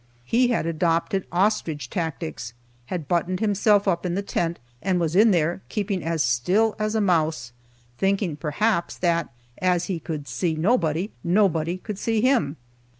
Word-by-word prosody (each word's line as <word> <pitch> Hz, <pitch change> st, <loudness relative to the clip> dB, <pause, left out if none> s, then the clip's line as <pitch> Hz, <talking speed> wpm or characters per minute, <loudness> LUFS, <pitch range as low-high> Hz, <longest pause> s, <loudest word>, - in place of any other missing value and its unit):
He 245 Hz, -, +3 dB
had 240 Hz, -8 st, 0 dB
adopted 170 Hz, +4 st, 0 dB
ostrich 175 Hz, -8 st, 0 dB
tactics, 125 Hz, -, -4 dB, 0.3 s
had 165 Hz, -3 st, -4 dB
buttoned 180 Hz, +1 st, 0 dB
himself 205 Hz, -1 st, +3 dB
up 170 Hz, -3 st, +1 dB
in 180 Hz, -1 st, -1 dB
the 200 Hz, -, -1 dB
tent, 170 Hz, -3 st, -1 dB, 0.2 s
and 185 Hz, -2 st, +1 dB
was 165 Hz, -1 st, -1 dB
in 215 Hz, +4 st, +6 dB
there 175 Hz, -1 st, +1 dB
keeping 200 Hz, -4 st, -2 dB
as 165 Hz, -2 st, 0 dB
still 180 Hz, -, +2 dB
as 215 Hz, +1 st, -1 dB
a 220 Hz, -, +2 dB
mouse, 160 Hz, -, +1 dB, 0.5 s
thinking, 195 Hz, -4 st, +1 dB
perhaps, 170 Hz, +6 st, -1 dB
that 170 Hz, -2 st, +1 dB, 0.3 s
as 180 Hz, -1 st, +2 dB
he 180 Hz, -3 st, -3 dB
could 150 Hz, -3 st, -5 dB
see 160 Hz, +7 st, -1 dB
nobody, 170 Hz, 0 st, +1 dB
nobody 175 Hz, -2 st, +2 dB
could 205 Hz, +1 st, -7 dB
see 225 Hz, 0 st, 0 dB
him. 215 Hz, -, +2 dB
175 Hz, 155 wpm, -24 LUFS, 160-205 Hz, 0.5 s, in